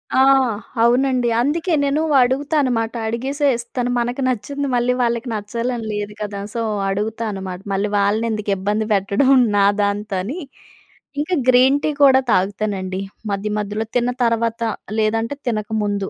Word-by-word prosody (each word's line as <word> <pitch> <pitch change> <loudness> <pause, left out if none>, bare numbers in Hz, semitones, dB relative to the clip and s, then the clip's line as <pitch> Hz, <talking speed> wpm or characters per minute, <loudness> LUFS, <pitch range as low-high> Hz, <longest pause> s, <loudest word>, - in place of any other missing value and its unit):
ఆ! - - +4 0.6
అవునండి. 250 +1 +3
అందుకే 320 +7 0
నేను 280 +2 +1 0.2
అడుగుతానమాట. 260 -3 +1
అడిగేసే 270 +6 -1
ఇస్తాను. 245 +1 -3
మనకు 245 +3 -2
నచ్చింది 280 +4 -2
మళ్ళీ 245 +1 +2
వాళ్ళకి 235 +1 0
నచ్చాలని 230 +3 -3
లేదు 210 0 -4
కదా! 205 -1 -4
సో 230 - -2 0.3
అడుగుతానుమాట. 200 -2 -3
మళ్ళీ 200 +2 0
వాళ్ళని 205 +3 +1
ఎందుకు 210 -1 -2
ఇబ్బంది 210 +3 -1
పెట్టడం 200 +7 +2 0.3
నా 200 - +5 0.2
దాంతో 205 0 -1
అని, 270 - -5 0.8
ఇంకా 360 +4 -1
గ్రీన్‌టీ 265 +4 +4
కూడా 265 -1 +6
తాగుతానండి 195 -1 -1 0.3
మధ్యమధ్యలో. 210 +1 -3
తిన్న 245 +1 +1
తర్వాత 230 0 0 0.4
లేదంటే 225 +5 0
తినక 215 -2 -1
ముందు. 200 -1 -2
230 Hz, 125 wpm, -20 LUFS, 205-255 Hz, 0.8 s, కూడా